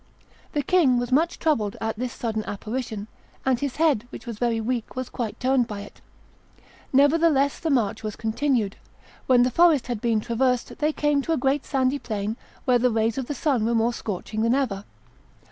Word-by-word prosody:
The 290 - 0
king 285 -7 +4
was 245 +1 -2
much 320 +6 +2
troubled 225 -11 0
at 225 0 -2
this 245 +2 -3
sudden 220 -2 -3
apparition; 220 0 -4 0.4
and 260 -2 +2
his 280 -2 -3
head, 295 -8 +2
which - - -10
was 230 -3 -6
very 235 -2 +1
weak, 235 0 -3
was 255 -1 -4
quite 225 -4 -4
turned 255 -1 +2
by 205 -1 -6
it. 205 - -13 0.9
Nevertheless 285 0 +3
the 325 - -2
march 235 -8 +1
was 215 -1 -4
continued. 225 -2 0 0.5
When 250 -2 +6
the 250 - +1
forest 330 -1 +4
had 240 -4 -4
been 230 -2 +2
traversed, 245 +3 0
they 300 +1 +2
came 295 -2 +1
to 325 - -1
a - - +1
great 270 +2 +1
sandy 265 0 +1
plain, 215 -2 -3 0.3
where 250 -2 +4
the 250 +1 +3
rays 225 +1 0
of 255 - -4
the 290 - -3
sun 270 -5 +1
were 235 +1 +1
more 230 +1 +2
scorching 215 0 -4
than 230 +3 +3
ever. 215 -8 -1
245 Hz, 195 wpm, -25 LUFS, 225-275 Hz, 0.9 s, When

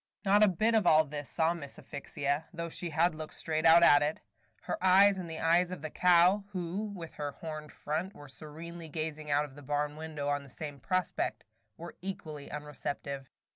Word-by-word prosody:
Not 200 +2 +5
a 215 - +8
bit 215 +5 +2
of 215 -5 +3
all 155 -1 +7
this 145 -1 -6
saw 165 0 +2
Miss 145 -5 -8
Asphyxia, 140 +2 -3
though 170 -1 -5
she 175 +1 -4
had 165 +2 +2
looked 155 0 -8
straight 160 0 0
out 170 +1 +8
at 145 -4 +7
it. 150 +2 0 0.4
Her - - -4
eyes 190 +1 +6
and 175 -2 -6
the 160 - -6
eyes 170 +2 +3
of 180 -4 -7
the 155 - -4
cow, 180 +3 +5
who, 185 +3 -3
with 185 -6 -7
her 145 -1 -4
horned 155 -2 -7
front, 165 +6 -3
was 145 -2 -11
serenely 165 +2 -9
gazing 155 0 -4
out 145 +1 +2
of 140 - -13
the 145 - -12
barn 145 +1 -1
window 155 -2 -5
on 145 0 0
the 140 - -14
same 145 +1 -7
prospect, 185 +6 -1 0.3
were 170 +1 -9
equally 155 -6 -6
unreceptive. 140 -2 -5
160 Hz, 200 wpm, -31 LUFS, 145-175 Hz, 0.4 s, a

